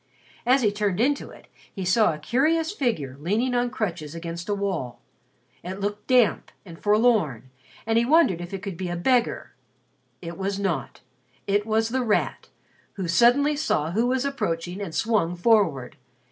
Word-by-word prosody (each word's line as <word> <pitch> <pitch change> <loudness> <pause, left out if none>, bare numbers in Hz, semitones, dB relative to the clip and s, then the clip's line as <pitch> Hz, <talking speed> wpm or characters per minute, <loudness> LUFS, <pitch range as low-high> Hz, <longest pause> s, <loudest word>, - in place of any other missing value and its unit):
As 260 +1 +4
he 210 - +3
turned 205 -2 -1
into 275 +4 +1
it, - - -15 0.3
he 190 -3 -5
saw 205 +2 +4
a 155 - -5
curious 310 - +1
figure 190 - -2
leaning 215 - 0
on 245 0 +1
crutches 175 - -4
against 170 +2 -6
a 205 - +1
wall. 185 -11 -3 0.6
It 185 +2 -6
looked 205 +1 -4
damp 250 -4 +3
and 165 -3 -11
forlorn, 205 - +2 0.3
and 225 0 +2
he 235 - +1
wondered 265 - +3
if 175 - -7
it 195 -1 -6
could 195 -5 -5
be 185 -1 -4
a 175 - -3
beggar. 240 +7 0 0.7
It 170 +1 -8
was 195 +1 -2
not. 185 -8 -3 0.4
It 205 +2 0
was 220 +1 +1
The 260 +2 0
Rat, 220 -4 -1 0.4
who 190 -3 -4
suddenly 245 - +4
saw 165 - 0
who 225 +6 +1
was 260 +1 0
approaching 190 -8 -3
and 175 -5 -5
swung 210 -7 +1
forward. 175 - +2
205 Hz, 170 wpm, -25 LUFS, 175-240 Hz, 0.7 s, As